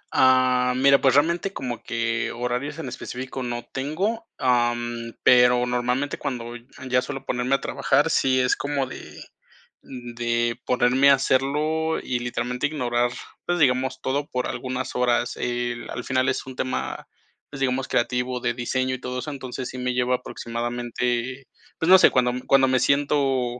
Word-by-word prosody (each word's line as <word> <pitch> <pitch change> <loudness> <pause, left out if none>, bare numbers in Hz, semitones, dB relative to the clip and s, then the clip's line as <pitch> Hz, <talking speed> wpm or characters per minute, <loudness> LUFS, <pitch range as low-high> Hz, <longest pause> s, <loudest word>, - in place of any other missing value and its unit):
Ah, 130 -1 +4
mira, 140 +1 +5
pues 130 -1 +4
realmente 170 +6 +2
como 125 -3 -5
que 115 0 -2
horarios 125 +5 -3
en 160 -5 -5
específico 130 +1 -6
no 120 -1 -4
tengo, 190 - -2
am, 120 -2 0
pero 125 0 +5
normalmente 125 +3 -1
cuando 120 -2 -4
n 120 +1 -12 0.2
ya 125 0 +2
suelo 135 +1 -6
ponerme 125 +2 0
a 135 - -3
trabajar, - - +1
sí 130 -1 +2
es 125 0 +2
como 145 -2 -2
de, 130 - -10 0.6
de 120 -1 -2
ponerme 125 +3 +4
a - - +8
hacerlo 150 +5 0
y 125 -1 -2
literalmente 125 +2 -2
ignorar, 120 -4 0 0.3
pues 175 0 0
digamos, 130 -3 +2
todo 140 +2 -1
por 125 0 -3
algunas 130 0 -4
horas. 120 -1 +1
Eh, 120 0 -2
l 120 - -8
al - - -5
final 130 0 +1
es 130 - -3
un 130 -1 -9
tema, 130 0 -3 0.4
pues 135 -2 -8
digamos, 130 0 0
creativo 125 +1 -1
de 120 - -1
diseño 130 +1 -1
y 130 - -6
todo 125 0 -4
eso, 150 - -4
entonces 130 -2 -6
sí 130 - -8
me 125 0 -1
lleva 125 0 +1
aproximadamente 120 +2 -3 0.3
pues 165 - -1
no 190 - +10
sé, - - +6
cuando 125 -1 +2
me 125 - -5
cuando 135 -1 +5
me 130 0 +2
siento 135 -2 +1
125 Hz, 170 wpm, -24 LUFS, 120-135 Hz, 0.6 s, no